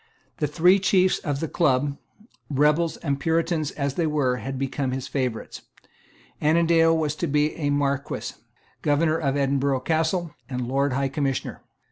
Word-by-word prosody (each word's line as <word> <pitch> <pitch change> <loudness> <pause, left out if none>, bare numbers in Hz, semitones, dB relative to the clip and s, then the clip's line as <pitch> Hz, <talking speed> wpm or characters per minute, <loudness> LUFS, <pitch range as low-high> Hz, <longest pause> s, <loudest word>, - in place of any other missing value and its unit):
The 150 - 0
three 175 +6 +4
chiefs 185 -1 +3
of 145 -1 -3
the 160 - -1
Club, 140 -3 +1 0.5
rebels 150 +3 +2
and 140 -3 -2
Puritans 165 0 0
as 140 -2 -3
they 165 +2 0
were, 140 -5 +1
had 135 +1 -5
become 135 0 -2
his 130 -1 -4
favourites. 125 -5 -3 0.8
Annandale 165 +1 +4
was 150 -2 -1
to 170 - -1
be 150 +1 +1
a 145 -3 -1
Marquess, 140 -1 -2 0.4
Governor 155 +2 +2
of 140 -3 0
Edinburgh 140 -1 +1
Castle, 160 +3 0 0.2
and 125 -2 -3
Lord 135 +1 +1
High 135 +1 0
Commissioner. 135 -1 -2
145 Hz, 150 wpm, -24 LUFS, 135-160 Hz, 0.8 s, three